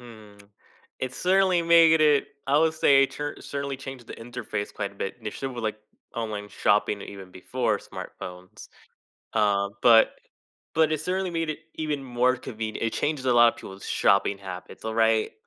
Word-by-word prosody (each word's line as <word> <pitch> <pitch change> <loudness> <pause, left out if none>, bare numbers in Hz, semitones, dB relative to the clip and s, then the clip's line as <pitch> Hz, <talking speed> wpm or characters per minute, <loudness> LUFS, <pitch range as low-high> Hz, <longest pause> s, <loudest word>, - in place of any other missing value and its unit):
Hmm, 110 -4 -14 0.6
it 130 0 -4
certainly 185 -1 +3
made 165 -1 +6
it 150 -2 +4 0.2
I 140 +2 +3
would 160 0 +3
say, 140 -3 +5
it - - -5
tur 145 0 -5
certainly 140 -1 -4
changed 135 -2 -9
the - - -8
interface 115 -3 -5
quite 100 -1 -4
a - - -20
bit 100 -1 -4
initially 125 +4 -5
with, 120 -2 -5
like, 110 0 -2 0.4
online 105 -3 -4
shopping 105 0 +1
even 95 -2 -9
before 90 - -1
smartphones. 90 0 -10 0.7
Uh, 100 -2 +2
but 115 -2 +6 0.6
but 160 0 +3
it 155 - -1
certainly 185 +2 -1
made 165 -2 -1
it 155 - -5 0.2
even 150 -3 -3
more 125 0 +2
conven 110 -4 -5
it 115 - -1
changed 145 -3 -1
a 125 - +4
lot 120 0 +7
of - - -20
people's 95 0 -10
shopping 100 0 +2
habits, 95 +1 -9
alright? 110 0 +2
120 Hz, 170 wpm, -26 LUFS, 105-150 Hz, 0.7 s, lot